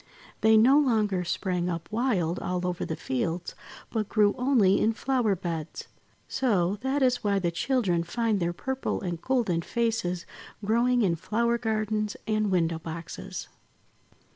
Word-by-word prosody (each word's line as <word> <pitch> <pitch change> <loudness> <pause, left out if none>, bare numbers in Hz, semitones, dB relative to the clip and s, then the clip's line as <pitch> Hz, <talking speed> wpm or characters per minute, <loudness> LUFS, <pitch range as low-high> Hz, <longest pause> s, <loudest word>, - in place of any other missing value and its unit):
They 220 0 +6
no 260 +7 +6
longer 215 -9 +1
sprang 180 0 -1
up 170 -1 -4
wild 205 -8 0
all 180 0 -2
over 180 -1 -2
the 160 - -3
fields, 165 +8 -3 0.4
but 215 -3 -2
grew 210 -2 +3
only 245 -7 +3
in 225 - +3
flower 240 -4 +1
beds. 165 -4 -5 0.4
So, 200 -7 +1
that 265 +2 0
is 250 -1 +2
why 200 -1 +2
the 175 -3 0
children 190 -3 +1
find 220 +4 0
their 170 -1 0
purple 265 +9 -3
and 175 -3 -4
golden 230 -11 +1
faces 220 -5 -1 0.4
growing 240 +3 +3
in 170 -4 +1
flower 235 +6 0
gardens 215 -2 -1
and 215 -1 +1
window 165 -3 +1
boxes. 165 0 -7
210 Hz, 145 wpm, -27 LUFS, 175-235 Hz, 0.4 s, They